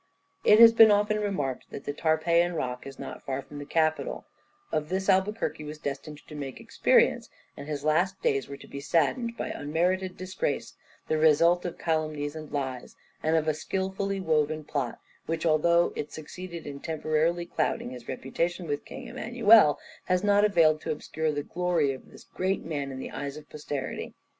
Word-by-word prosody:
It 210 - +7
has 230 0 +10
been 225 -1 +8
often 210 +1 +3
remarked 165 -11 -2
that 140 - -8
the 145 - -3
Tarpeian 170 +3 +2
rock 125 -3 -3
is 135 - -9
not 135 - -7
far 135 0 -4
from 145 +2 -10
the 145 - -8
Capitol; 155 -1 0 0.5
of 150 0 -1
this 190 +1 -1
Albuquerque 190 -3 +1
was 150 +1 -7
destined 150 +1 -6
to - - -11
make 140 -3 -6
experience, - - +2 0.3
and 140 - -9
his 145 -2 -4
last 175 +6 +1
days 135 -1 0
were 140 - -7
to - - -14
be 140 - -7
saddened 230 - 0
by - - -3
unmerited 180 +5 -1
disgrace, 185 - -3 0.3
the 155 - +1
result 165 +3 +4
of 175 - -4
calumnies 155 -2 -1
and 155 -1 -8
lies, 130 -3 -4 0.3
and 160 +1 +1
of 160 -1 +1
a 155 - +3
skilfully 190 +4 -2
woven 155 -3 +1
plot, 140 -5 -3 0.3
which, 165 0 -2
although 170 +2 +3
it 150 - -4
succeeded 170 +2 -8
in 140 -1 -7
temporarily 160 +2 0
clouding 125 - -1
his 125 -2 -10
reputation 170 +8 -2
with 145 -2 -3
King - - -9
Emmanuel, 225 -9 +5 0.3
has 180 0 +1
not 205 0 +4
availed 165 -7 +4
to - - -3
obscure 155 +1 -2
the 145 -1 -3
glory 175 -5 0
of 130 - -9
this - - -14
great 190 +1 -2
man 145 -4 -3
in 130 - -6
the 130 - -6
eyes 140 +1 -5
of 150 -1 -11
posterity. 145 -3 -5
155 Hz, 180 wpm, -28 LUFS, 145-185 Hz, 0.5 s, has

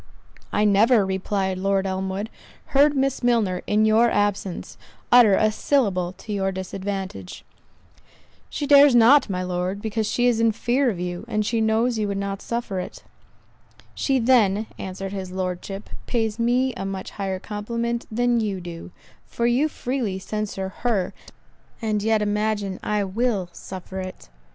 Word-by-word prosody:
"I 210 - +2
never," 210 +2 +4
replied 190 0 -1
Lord 195 0 +1
Elmwood, 190 +3 -3 0.4
"heard 285 +1 +5
Miss 270 0 0
Milner, 225 -7 +1
in 215 +1 +3
your 225 +2 +4
absence, 205 -3 -1 0.4
utter 240 -5 +7
a 215 +1 +3
syllable 200 -9 0
to 210 +3 -7
your 195 -1 0
disadvantage." 190 - -5 1.0
"She 290 - -3
dares 285 -2 +7
not, 240 +3 +6
my 185 -1 -2
Lord, 180 +2 -2
because 220 0 -2
she 245 - +1
is 240 -2 +3
in 225 -1 +3
fear 250 +4 +1
of 195 -6 -3
you 180 +1 -4
and 215 -2 -1
she 230 +1 0
knows 225 +2 +1
you 210 - 0
would 200 -1 -2
not 195 0 -3
suffer 235 -5 -3
it." 180 - -7 0.9
"She 270 -2 +1
then," 225 -4 +3
answered 195 0 -5
his 190 -2 -5
Lordship, 185 +2 -4 0.2
"pays 225 -2 -1
me 250 +2 +2
a 190 - -6
much 195 -1 -5
higher 195 -2 -3
compliment 235 +4 -3
than 240 +1 +2
you 205 -4 -2
do; 170 -1 -8 0.4
for 235 - -2
you 245 +6 +3
freely 245 -9 -3
censure 195 -1 -4
her, 215 -7 0 0.7
and 215 -3 -1
yet 220 0 +2
imagine 205 -2 -1
I 210 -1 0
will 200 -2 -1
suffer 190 0 -8
it." 185 - -8
210 Hz, 155 wpm, -23 LUFS, 190-235 Hz, 1.0 s, utter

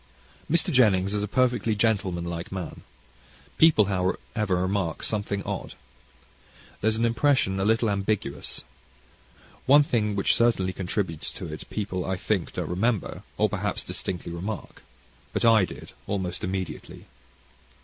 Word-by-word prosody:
Mr. 170 +2 +3
Jennings 100 -6 +4
is 105 - 0
a 105 - -1
perfectly 120 -1 +1
gentlemanlike 90 -6 -1
man. 95 -4 -5 0.8
People, 160 -10 +6
however, 95 +1 -1
remark 90 -2 -1
something 100 -2 -1
odd. - - -5 1.0
There 110 - 0
is 110 - +3
an 115 - +2
impression 115 -4 +2
a 95 - +1
little 115 +2 +3
ambiguous. 100 -8 -1 1.0
One 145 +2 +8
thing 105 -7 0
which 100 - +3
certainly 105 -6 +2
contributes 90 -3 -2
to - - -6
it, - - -9
people 95 -4 -3
I 95 - -1
think 95 -1 -1
don't - - -3
remember; 105 +4 -1 0.2
or, - - +4
perhaps, - - -2
distinctly 90 -2 -4
remark. 95 +5 -6 0.5
But - - 0
I 110 -4 +6
did, - - -10 0.2
almost 95 -3 -2
immediately. 95 +1 -4
100 Hz, 135 wpm, -26 LUFS, 95-115 Hz, 1.0 s, One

